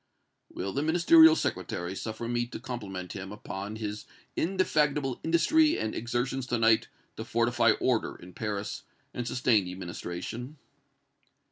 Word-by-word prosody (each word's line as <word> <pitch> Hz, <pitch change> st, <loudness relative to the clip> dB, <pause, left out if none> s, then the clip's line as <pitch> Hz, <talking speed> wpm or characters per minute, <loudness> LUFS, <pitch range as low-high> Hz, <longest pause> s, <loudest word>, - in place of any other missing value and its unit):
"Will 95 Hz, +1 st, -4 dB
the 140 Hz, -, 0 dB
Ministerial 160 Hz, 0 st, +7 dB
Secretary 90 Hz, -, -2 dB
suffer 110 Hz, +3 st, -5 dB
me 120 Hz, 0 st, 0 dB
to -, -, -7 dB
compliment 95 Hz, -7 st, -6 dB
him 95 Hz, 0 st, -7 dB
upon 105 Hz, 0 st, -6 dB
his 105 Hz, -1 st, -5 dB, 0.3 s
indefatigable 150 Hz, -7 st, +1 dB
industry 305 Hz, -, +3 dB
and 110 Hz, -, -2 dB
exertions 120 Hz, +2 st, -2 dB
to 120 Hz, -, 0 dB
night 115 Hz, -1 st, +4 dB, 0.3 s
to -, -, -4 dB
fortify -, -, +3 dB
order -, -, 0 dB
in 90 Hz, +1 st, -13 dB
Paris 105 Hz, -1 st, -4 dB, 0.3 s
and 120 Hz, -1 st, -4 dB
sustain 120 Hz, -5 st, +2 dB
the 90 Hz, -, -6 dB
administration?" 95 Hz, -, -6 dB
120 Hz, 135 wpm, -29 LUFS, 100-140 Hz, 0.3 s, Ministerial